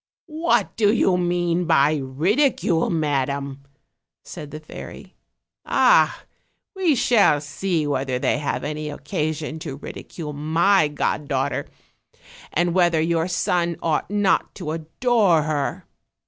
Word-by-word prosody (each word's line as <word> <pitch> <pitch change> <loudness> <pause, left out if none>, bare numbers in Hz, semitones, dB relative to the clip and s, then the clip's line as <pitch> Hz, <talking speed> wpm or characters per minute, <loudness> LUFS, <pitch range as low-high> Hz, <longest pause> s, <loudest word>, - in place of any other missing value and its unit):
"What 325 +1 0
do 210 -2 +4
you 195 -5 +2
mean 175 0 0
by 155 -1 +3
ridicule, 165 - +1
madam?" 140 -3 -1 0.6
said 150 -5 -9
thefairy. 155 +1 -10 0.5
"Ah! - - +3 0.5
we 360 -6 +2
shall 230 - +4
see 155 +3 -2
whether 135 -3 -1
they 130 - 0
have 145 - -2
any 150 +1 -4
occasion 150 +2 -4
to 155 -4 -6
ridicule 150 +1 -8
my 160 +4 +2
god 145 0 -2
daughter, 135 +1 -1 0.8
and 175 0 +1
whether 175 -3 +3
your 165 +1 +1
son 175 -1 0
ought 160 0 0
not 205 -2 +1
to 170 -6 -5
adore 170 +2 +1
her. 150 -2 -2
160 Hz, 120 wpm, -22 LUFS, 145-180 Hz, 0.8 s, do